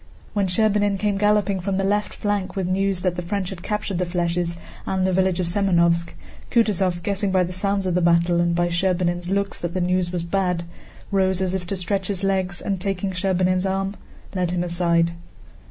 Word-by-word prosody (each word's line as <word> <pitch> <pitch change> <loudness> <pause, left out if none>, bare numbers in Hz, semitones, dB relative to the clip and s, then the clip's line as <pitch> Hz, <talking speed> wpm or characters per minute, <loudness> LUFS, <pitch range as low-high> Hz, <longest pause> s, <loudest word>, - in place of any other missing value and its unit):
When 200 -3 +1
Scherbínin 205 +1 +2
came 205 0 0
galloping 205 -2 +2
from 190 +1 -1
the 195 - 0
left 205 +2 0
flank 205 -2 -2
with 190 -2 -1
news 190 0 0
that 180 -1 0
the - - -1
French 185 +1 -3
had 180 -2 -7
captured 210 -2 -2
the 180 - +1
flèches 170 -1 -1 0.3
and 190 -1 +1
the 190 - +1
village 185 -1 +2
of 180 - +1
Semënovsk, 170 -2 +2 0.4
Kutúzov, 190 -6 +1
guessing 200 +1 0
by 185 -1 +3
the 180 +1 -4
sounds 195 +1 0
of 185 - 0
the 180 - +2
battle 170 0 +3
and 170 0 +1
by 175 0 +2
Scherbínin's 175 0 0
looks 200 0 -1
that 175 +1 -4
the - - +1
news 180 0 +1
was 175 -2 -2
bad, 180 -1 0 0.5
rose 190 -2 +2
as 190 -1 0
if 185 -2 -3
to 195 - -2
stretch 190 +1 -1
his 195 -2 -3
legs 190 -2 0
and, 195 -3 -2
taking 195 0 -2
Scherbínin's 185 0 +1
arm, 195 +1 -1 0.4
led 180 -2 0
him 175 0 0
aside. 170 -1 +2
185 Hz, 200 wpm, -23 LUFS, 175-195 Hz, 0.5 s, by